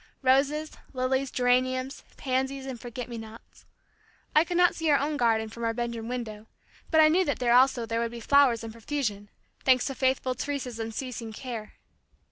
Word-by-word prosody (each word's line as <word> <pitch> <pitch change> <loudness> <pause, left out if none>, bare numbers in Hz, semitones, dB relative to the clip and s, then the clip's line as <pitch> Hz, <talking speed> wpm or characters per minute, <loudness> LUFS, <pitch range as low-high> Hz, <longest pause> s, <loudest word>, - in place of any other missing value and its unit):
roses, 285 +4 +2 0.2
lilies, 260 +1 0
geraniums, 255 +2 0
pansies 265 +1 -1
and 260 -3 -6
forget 240 0 -6
me 235 -2 -6
nots. 220 +1 -13 0.7
I 305 - +7
could 345 +1 -2
not 355 -1 +5
see 325 -1 -1
our 290 - +6
own 295 +2 -1
garden 225 -4 +2
from 235 +2 -8
our 225 0 0
bedroom 235 -1 -3
window, 225 -3 -5 0.4
but 315 - +4
I 310 - +8
knew 345 +5 +4
that 285 -6 -1
there 240 -1 +2
also 250 -1 +4
there 230 +1 -2
would 235 0 0
be 235 0 -8
flowers 250 -2 +4
in 225 - -6
profusion, 220 -4 -3 0.3
thanks 255 -2 +4
to 270 - -2
faithful 260 -1 +1
Teresa's 255 -3 -4
unceasing 225 0 -5
care. 225 -3 -7
255 Hz, 180 wpm, -27 LUFS, 230-275 Hz, 0.7 s, I